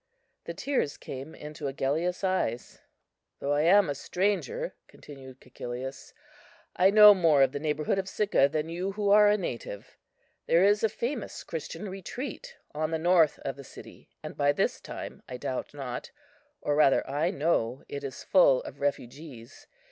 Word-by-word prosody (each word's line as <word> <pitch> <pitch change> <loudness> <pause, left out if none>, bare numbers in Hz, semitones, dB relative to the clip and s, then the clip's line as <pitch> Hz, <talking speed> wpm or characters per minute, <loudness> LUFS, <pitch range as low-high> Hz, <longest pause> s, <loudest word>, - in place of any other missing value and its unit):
The - - -6
tears 265 - -1
came 135 +4 -8
into 150 0 -7
Agellius's 150 +8 -1
eyes. 185 -11 -2 0.6
"Though 140 +1 -1
I 145 - +2
am 190 +4 +5
a 145 - -1
stranger," 205 - -2
continued 130 -2 -13
Cæcilius, 125 +1 -8 0.6
"I 185 +2 +5
know 210 0 +9
more 165 -7 +4
of 130 - +2
the 145 - -4
neighbourhood 150 +4 -1
of 190 0 -4
Sicca 195 -11 +2
than 155 +1 -2
you 180 +4 -3
who 205 0 0
are 210 0 +7
a 210 - +3
native. 115 - -7 0.5
There 170 +2 +4
is 205 +2 +3
a 220 - +3
famous 235 +3 -4
Christian 165 +6 -6
retreat 250 - -7 0.2
on 155 +1 -2
the 160 - -1
north 165 -2 +3
of 135 - -3
the 140 - -9
city, - - -14
and - - -7
by 145 0 +2
this - - -1
time, - - -8
I 125 - -5
doubt 130 +1 -4
not, 135 -4 -6 0.5
or 145 - 0
rather 145 -2 +4
I 145 +5 0
know, 140 - 0
it 140 0 -6
is 135 -2 -7
full 155 -9 +4
of 140 - -10
refugees. 140 -3 -5
155 Hz, 165 wpm, -28 LUFS, 140-195 Hz, 0.6 s, know